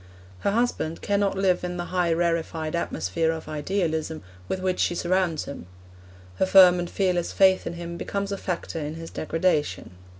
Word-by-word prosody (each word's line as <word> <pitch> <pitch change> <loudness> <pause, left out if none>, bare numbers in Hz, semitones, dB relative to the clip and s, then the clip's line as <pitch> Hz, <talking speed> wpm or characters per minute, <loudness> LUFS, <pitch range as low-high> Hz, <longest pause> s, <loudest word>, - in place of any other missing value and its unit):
Her - - 0
husband 210 -7 -1
cannot 200 -1 +1
live 185 -2 +2
in 180 0 -3
the 175 - -3
high 175 -2 +2
rarefied 165 -1 -1
atmosphere 125 - -1
of 160 -1 -6
idealism 160 - -2 0.2
with 190 - -2
which 185 -1 -1
she 175 - +1
surrounds 175 -3 0
him; 140 -10 -8 0.7
her - - +3
firm 185 -2 +7
and 175 -1 -3
fearless 180 -3 0
faith 190 -1 +4
in 170 - -3
him 170 0 -6
becomes 200 +2 -3
a 200 - -2
factor 170 -2 -3
in 150 0 -4
his 165 0 -8
degradation. 155 - -1
175 Hz, 170 wpm, -25 LUFS, 160-185 Hz, 0.7 s, firm